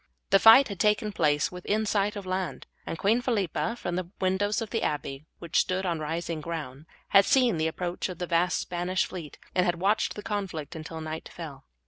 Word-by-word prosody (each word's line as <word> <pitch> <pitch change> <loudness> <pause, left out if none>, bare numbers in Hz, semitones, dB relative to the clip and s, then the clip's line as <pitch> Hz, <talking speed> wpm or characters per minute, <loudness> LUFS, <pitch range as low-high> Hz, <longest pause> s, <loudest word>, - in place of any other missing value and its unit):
The 195 - +7
fight 225 +6 +9
had 200 -3 -6
taken 210 +1 +2
place 150 -6 +1
within 205 +4 -1
sight 205 0 +1
of 200 -2 -6
land, 185 -1 -3 0.2
and 165 - -3
Queen 220 +7 +2
Philippa, 230 -2 -1
from 175 -7 -3
the 180 -2 -3
windows 190 +3 +1
of 225 -2 -5
the 225 - 0
abbey, 145 0 -3
which 170 -2 0
stood 185 +1 0
on 170 -3 -1
rising 160 +1 -3
ground, 150 -3 -6 0.2
had 195 - +7
seen 245 -4 +3
the 160 0 +1
approach 175 +3 -3
of 180 - -6
the 180 - -3
vast 175 +1 +2
Spanish 180 +1 -1
fleet, 170 -5 -8 0.2
and 180 - +3
had 175 -1 +1
watched 200 +4 +1
the 210 - -7
conflict 185 -8 -4
until 160 0 -7
night 155 0 -6
fell. 150 -6 -9
180 Hz, 200 wpm, -28 LUFS, 160-205 Hz, 0.2 s, fight